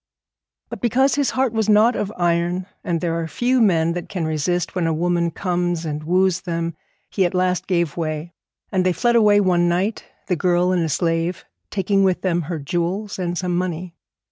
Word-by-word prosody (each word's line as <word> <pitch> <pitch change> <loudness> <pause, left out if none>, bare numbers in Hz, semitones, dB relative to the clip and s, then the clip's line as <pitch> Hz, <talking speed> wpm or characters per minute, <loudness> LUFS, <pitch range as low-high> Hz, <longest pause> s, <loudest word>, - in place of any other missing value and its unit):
But - - -7
because 255 +3 +2
his 285 0 +1
heart 260 -3 0
was 220 -1 0
not 215 +3 +5
of 205 -1 -2
iron, 175 +1 0 0.2
and 170 -2 -1
there 170 -1 -1
are 165 - -3
few 245 +8 +1
men 170 -6 +3
that 175 0 -6
can 175 -4 -3
resist 160 +3 -1
when 180 -3 0
a 165 - +1
woman 170 +1 +1
comes 175 -1 -2
and 150 -1 -4
woos 185 +2 +2
them, 170 -2 -3 0.4
he 195 - +1
at 180 0 0
last 180 0 0
gave 170 -5 0
way; 160 0 -3 0.4
and 185 -2 +1
they 185 0 +2
fled 240 +5 +1
away 210 -3 +5
one 175 -3 +2
night, 185 +6 -1 0.2
the 180 - 0
girl 180 +1 +2
and 180 -2 +1
the 160 - -1
slave, 165 +3 -1 0.2
taking 195 0 +1
with 185 -2 +1
them 175 -2 +1
her 170 - -2
jewels 175 +8 -3
and 175 -1 -2
some 180 -1 -1
money. 180 -1 -3
180 Hz, 195 wpm, -21 LUFS, 170-195 Hz, 0.4 s, not